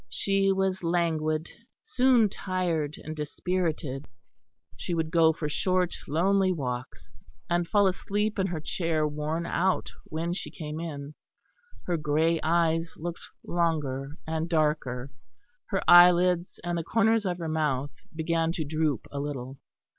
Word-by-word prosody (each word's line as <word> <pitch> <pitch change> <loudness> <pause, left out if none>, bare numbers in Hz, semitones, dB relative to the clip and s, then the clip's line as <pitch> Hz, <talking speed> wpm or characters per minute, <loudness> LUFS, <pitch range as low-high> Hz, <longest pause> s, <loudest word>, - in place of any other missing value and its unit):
She 195 - +1
was 190 -1 0
languid, 160 -2 0 0.3
soon 250 -3 +4
tired 175 -6 -2
and 155 - -6
dispirited; 155 -2 -2 0.7
she 175 - -3
would 160 -1 -1
go 165 -2 +5
for 160 -1 -4
short, 185 +4 +1
lonely 190 +5 +2
walks, 130 -6 -5 0.4
and 175 0 +1
fall 205 +1 +4
asleep 205 +3 0
in 190 - +2
her 175 -4 -3
chair 160 -1 0
worn 150 +3 -2
out 185 +2 0
when 165 +2 -3
she - - -5
came 155 -1 -6
in. 145 -3 -6 0.7
Her 175 -2 0
grey 155 +2 +1
eyes 165 0 +1
looked 170 +1 -5 0.2
longer 150 -4 -1
and 160 +1 -2
darker; 150 -5 0 0.6
her 195 -2 -1
eyelids 175 0 +6
and 175 0 -1
the - - -3
corners 225 +2 +2
of 175 -1 -1
her 170 -2 -4
mouth 145 -3 0 0.2
began 165 0 0
to 160 -3 -3
droop 155 -4 -1
a 140 - -4
little. 135 -2 -5
165 Hz, 140 wpm, -28 LUFS, 150-180 Hz, 0.7 s, eyelids